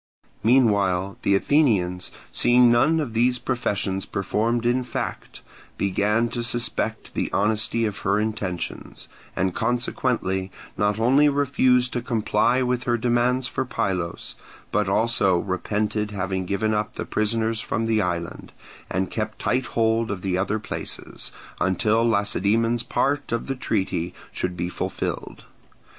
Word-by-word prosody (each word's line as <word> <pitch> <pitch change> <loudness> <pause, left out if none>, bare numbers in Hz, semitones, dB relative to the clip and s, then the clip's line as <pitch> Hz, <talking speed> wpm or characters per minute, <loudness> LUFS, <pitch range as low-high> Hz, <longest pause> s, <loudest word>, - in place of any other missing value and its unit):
Meanwhile 100 -6 +3
the 100 - +3
Athenians, 95 - +2 0.2
seeing 120 0 +5
none 150 +8 +4
of 135 -7 -3
these 125 +2 +2
professions 100 -7 -2
performed 115 +5 0
in 125 +2 +2
fact, 120 - -5 0.3
began 105 +4 +1
to 120 - -3
suspect 120 0 -2
the - - -2
honesty 110 +3 +1
of 105 -2 -3
her 100 +2 +1
intentions, 105 -5 -4 0.3
and 95 0 0
consequently 115 -5 -1 0.3
not 105 +1 +1
only 135 +6 +5
refused 130 -3 +2
to 120 - -1
comply 115 +1 +1
with 125 0 -1
her 120 -1 +2
demands 120 +2 +1
for - - -2
Pylos, 95 -9 -3 0.4
but 105 -1 +1
also 100 -3 +2
repented 105 +3 -1
having 95 -2 -3
given 110 +3 0
up 105 0 -2
the - - -4
prisoners 110 +1 0
from 115 - -2
the 110 -1 +2
island, 85 -2 -4 0.4
and 95 0 -1
kept 110 0 -3
tight 130 0 0
hold 115 0 +2
of 95 -3 -4
the 95 -2 0
other 100 +3 0
places, 110 - -6 0.3
until 105 +5 +2
Lacedaemon's 110 +1 +2
part 140 +3 -1
of 115 0 -1
the 135 - -2
treaty 95 -8 -2 0.2
should 90 -1 -3
be 85 +1 -1
fulfilled. 90 - -4
110 Hz, 135 wpm, -24 LUFS, 100-120 Hz, 0.4 s, seeing